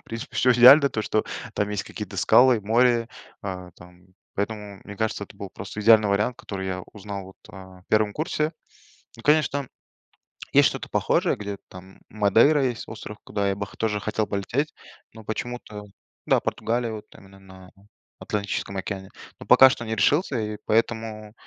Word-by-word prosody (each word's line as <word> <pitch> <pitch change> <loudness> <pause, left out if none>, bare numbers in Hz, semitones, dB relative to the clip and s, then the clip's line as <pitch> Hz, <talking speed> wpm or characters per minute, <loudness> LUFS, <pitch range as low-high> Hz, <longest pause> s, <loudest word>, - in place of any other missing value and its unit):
В - - -31
принципе, 115 0 -7
всё 125 0 +4
идеально, 135 +4 +8
то 110 -5 -3
что 110 - 0 0.3
там 105 0 0
есть 105 -2 -3
какие-то - - -8
скалы, 125 -3 +5
море, 115 +2 +2 0.3
э, 90 -2 -6
там, 90 0 -16 0.3
поэтому, 105 -1 -4
мне 105 -1 -9
кажется, 110 -2 -2
это 100 - -17
был 100 -1 -7
просто 95 +2 -8
идеальный 110 -1 +6
вариант, 105 +5 0
который 95 -1 -6
я 90 -1 -4
узнал 100 -1 -7
вот, 95 - -14 0.2
э, 95 -1 -13
1 105 -1 +2
курсе. 155 0 -2 0.7
Ну, 115 - -13
конечно, 150 -1 +3
там 135 - -12 0.8
есть - - +6
что-то - - -7
похожее, - - +1
где 100 -1 -5
там 95 +1 -13
Мадейра 115 +7 +4
есть 120 -3 -2
остров, 110 -1 -9
куда 100 -1 -1
я 100 - -1
бы 100 +1 -4
хо - - -16
тоже 105 -2 -1
хотел 110 +1 -1
полететь, 120 +9 -2 0.4
но 110 - -12
почему-то 110 -1 -6 0.4
Да, - - +4
Португалия, 120 0 -2
вот 105 - -8
там 95 - -17
она 95 0 -17
на 95 -1 -15 0.5
Атлантическом 100 -1 -3
океане. 95 0 -5 0.3
Но - - -10
пока 130 0 +8
что 120 -3 -4
не 110 0 -2
решился, 145 - +2
и 105 -1 -4
поэтому 110 -1 -1
105 Hz, 175 wpm, -24 LUFS, 100-115 Hz, 0.8 s, идеально